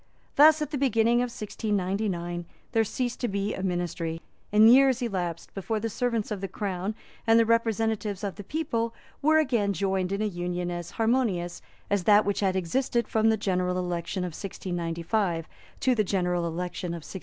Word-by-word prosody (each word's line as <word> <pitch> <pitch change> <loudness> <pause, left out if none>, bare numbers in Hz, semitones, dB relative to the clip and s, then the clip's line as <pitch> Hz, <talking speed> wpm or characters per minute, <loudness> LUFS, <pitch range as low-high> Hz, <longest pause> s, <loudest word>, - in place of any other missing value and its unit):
Thus, 305 +1 +7
at 300 - -6
the 285 - -2
beginning 235 -3 +3
of 245 0 +1
1699, 195 -5 -2 0.3
there 225 -2 +3
ceased 245 +3 -3
to 245 - 0
be 200 0 -1
a - - -5
ministry; 175 -3 -2 0.3
and 215 +1 +7
years 260 +1 +6
elapsed 180 -7 -3
before 215 +3 -2
the 225 +1 -3
servants 230 -2 -1
of 205 -3 -3
the 195 - -2
Crown 190 +1 -3 0.3
and 225 0 +6
the 230 - +5
representatives 225 -3 0
of 200 -2 -2
the 205 - -9
people 230 -4 -2 0.3
were 310 +2 +4
again 235 -10 +2
joined 190 0 0
in 200 +2 -1
an 210 -3 -2
union 175 0 -2
as 175 -1 -5
harmonious 220 -7 0 0.3
as 200 -3 +1
that 210 0 +6
which 200 0 0
had 190 -2 +1
existed 235 +7 0
from 220 0 +2
the 220 - +3
general 180 -2 0
election 180 +1 -2
of 180 -2 -4
1695 170 -1 -2 0.3
to 260 - +3
the 220 -3 +2
general 180 -3 0
election 175 +1 -4
of 170 -2 -6
1698. 190 - -7
200 Hz, 180 wpm, -27 LUFS, 180-230 Hz, 0.3 s, Thus